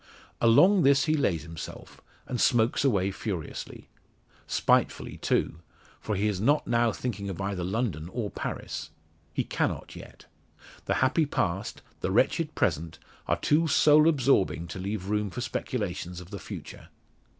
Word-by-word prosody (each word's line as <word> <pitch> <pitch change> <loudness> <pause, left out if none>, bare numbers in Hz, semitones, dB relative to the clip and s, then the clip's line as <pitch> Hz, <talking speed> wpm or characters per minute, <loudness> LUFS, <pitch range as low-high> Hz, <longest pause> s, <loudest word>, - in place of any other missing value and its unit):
Along 180 - +6
this 140 -1 +4
he 155 - +2
lays 95 - 0
himself, 80 -1 -9 0.2
and 125 - -3
smokes 120 +2 +3
away 100 -8 +2
furiously. 95 -5 -6 0.6
Spitefully, - - +1
too; 80 - 0 0.4
for 105 - -3
he 100 +2 +1
is 100 -3 -1
not 145 +7 +3
now 115 -1 +2
thinking 105 -4 -4
of 95 - -6
either 95 -2 -2
London 95 - -2
or 110 -2 -3
Paris. - - -5 0.4
He - - -1
cannot - - -2
yet. - - -12 0.6
The - - 0
happy 150 +4 +2
past, 95 -5 -2 0.2
the - - -2
wretched 160 -2 +1
present, 80 -1 0 0.3
are - - +2
too 160 +3 +2
soul 150 +1 +5
absorbing 130 - +2
to 90 - -6
leave 100 0 -3
room 105 0 -1
for 125 - -6
speculations 100 -7 -3
of 90 +2 -12
the 100 - -6
future. - - -9
105 Hz, 150 wpm, -28 LUFS, 95-130 Hz, 0.6 s, Along